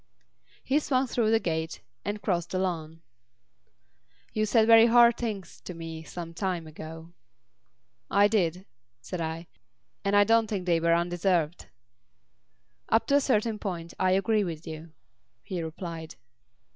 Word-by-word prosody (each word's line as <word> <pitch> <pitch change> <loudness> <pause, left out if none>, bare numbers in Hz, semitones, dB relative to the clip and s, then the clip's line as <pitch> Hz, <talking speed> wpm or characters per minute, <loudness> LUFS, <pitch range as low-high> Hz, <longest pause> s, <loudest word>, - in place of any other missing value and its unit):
He 280 +3 +2
swung 270 -3 +1
through 235 -3 0
the 225 0 +4
gate 160 -4 -3 0.2
and 205 0 -4
crossed 175 -3 0
the 185 - -2
lawn. 165 -3 -3 1.3
"You 215 0 0
said 220 +1 +4
very 225 0 +8
hard 235 0 +6
things 215 -6 -5
to 180 - -7
me 165 -1 -7
some 165 +1 -8
time 180 -2 -2
ago." 160 +2 -10 1.0
"I 200 +1 +5
did," 185 -4 0 0.3
said 175 +7 -6
I, 160 +1 -4 0.6
"and 200 0 +1
I 205 - +7
don't 225 +1 +3
think 200 -4 -3
they 170 -2 +2
were 170 0 +3
undeserved." 175 -1 0 1.2
"Up 225 - +3
to 280 - +4
a - - +2
certain 225 -4 +1
point 170 -5 -5
I 185 0 +3
agree 210 +2 +2
with 165 -4 -5
you," 160 +1 -8 0.5
he 180 -3 -4
replied. 165 0 -6
185 Hz, 145 wpm, -28 LUFS, 165-215 Hz, 1.3 s, very